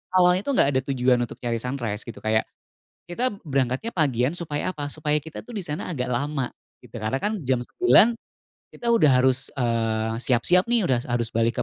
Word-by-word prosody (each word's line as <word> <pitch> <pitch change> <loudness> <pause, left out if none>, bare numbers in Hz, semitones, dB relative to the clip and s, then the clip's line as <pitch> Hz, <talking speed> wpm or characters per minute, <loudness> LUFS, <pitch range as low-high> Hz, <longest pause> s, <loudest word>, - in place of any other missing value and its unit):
awalnya 180 0 +5
tuh 280 - 0
enggak 140 - +4
ada 130 - +3
tujuan 125 -1 +2
untuk - - -11
cari 120 -2 -1
sunrise 120 -4 -3
gitu 110 -3 -8
kayak 110 0 +1 0.6
kita 245 +8 -1
berangkatnya 135 - -1
pagian 135 - +1
supaya 170 -1 -3
apa? 145 -4 -5
Supaya 150 0 -1
kita 160 +1 -9
tuh 245 - -12
di - - -1
sana 150 +3 -4
agak 130 -6 -3
lama 135 +1 -1 0.3
gitu 120 -1 -15
karena 110 +4 -1
kan 210 +5 -1
jam 130 -1 +1
9.00 235 - +4 0.5
kita 240 - -8
udah 230 -10 +5
harus, 130 0 +3
eee, 115 -3 -1
siap-siap 135 - +3
nih, 235 -2 +2
udah 130 -8 +2
harus - - -12
harus 120 -1 -1
balik 115 +1 +1
130 Hz, 190 wpm, -24 LUFS, 120-170 Hz, 0.6 s, awalnya